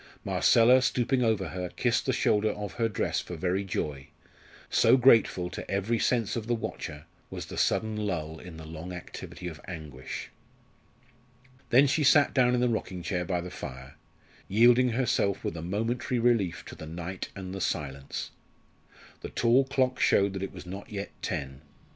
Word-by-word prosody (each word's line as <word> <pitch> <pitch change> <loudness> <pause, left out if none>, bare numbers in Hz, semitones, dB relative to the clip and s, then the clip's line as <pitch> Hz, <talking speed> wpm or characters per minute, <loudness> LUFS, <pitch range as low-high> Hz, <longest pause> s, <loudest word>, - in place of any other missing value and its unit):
Marcella, 125 +3 +5
stooping 125 +1 +1
over 110 -4 +1
her, 90 -1 -4
kissed - - 0
the - - +3
shoulder 105 +1 +2
of 105 -1 -5
her 115 -1 0
dress 105 - -1
for 90 - -6
very 90 +4 0
joy, 75 -7 -4 0.6
so 120 +3 +5
grateful 115 -8 +4
to - - -7
every 100 +4 0
sense 115 -3 +1
of 115 -2 -4
the 120 - +1
watcher 75 -8 -6 0.2
was - - -6
the - - -8
sudden 110 -1 +1
lull 85 -7 -3
in 90 -3 -10
the 80 - -9
long 80 +3 -7
activity 90 0 -8
of 80 -3 -8
anguish. 75 -7 -7 1.4
Then 130 +4 +6
she 145 +3 +1
sat 145 +1 +5
down 125 -2 +4
in 125 - +1
the 125 - +3
rocking 95 -6 -3
chair 90 -1 -1
by 90 0 -1
the 90 +1 -7
fire, 65 +1 -8 0.5
yielding 120 +4 +5
herself 115 -5 0
with - - -3
a 80 - -5
momentary 115 +8 -1
relief 115 -7 +1
to - - -9
the 80 - -9
night 85 +3 -5
and 95 -1 -6
the 95 - -5
silence. 70 -4 -3 0.9
The - - -6
tall 125 +3 +3
clock 130 -1 0
showed 100 0 +3
that 95 - -4
it 95 - -4
was 90 -2 -10
not 95 +3 -8
yet 100 -1 -5
ten. 70 -5 -4
100 Hz, 175 wpm, -28 LUFS, 85-120 Hz, 1.4 s, Then